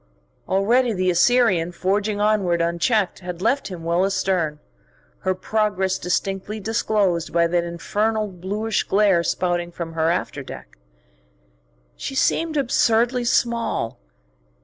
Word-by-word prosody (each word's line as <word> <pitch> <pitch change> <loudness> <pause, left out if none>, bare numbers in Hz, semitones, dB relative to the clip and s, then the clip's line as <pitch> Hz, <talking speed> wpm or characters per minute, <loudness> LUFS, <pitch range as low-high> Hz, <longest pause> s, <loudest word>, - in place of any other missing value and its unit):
Already 230 +6 +2
the 185 -1 +1
Assyrian, 180 -3 +3
forging 200 +4 -1
onward 205 -5 +2
unchecked, 170 +5 +1
had 180 -2 -7
left 255 +8 0
him 180 -4 -8
well 170 +2 +1
astern, 185 -5 0 0.6
her 185 0 -1
progress 195 -1 0
distinctly 195 +4 -2
disclosed 205 -5 0
by 170 0 +3
that 170 +1 +1
infernal 210 +6 -1
bluish 200 +4 -2
glare 195 -3 +3
spouting 175 0 -1
from 170 -1 -6
her 160 0 +1
after 170 - -2
deck. - - -10 1.2
She 270 - -6
seemed 320 +3 +1
absurdly 240 -1 +2
small. 235 - 0
195 Hz, 120 wpm, -22 LUFS, 175-220 Hz, 1.2 s, Assyrian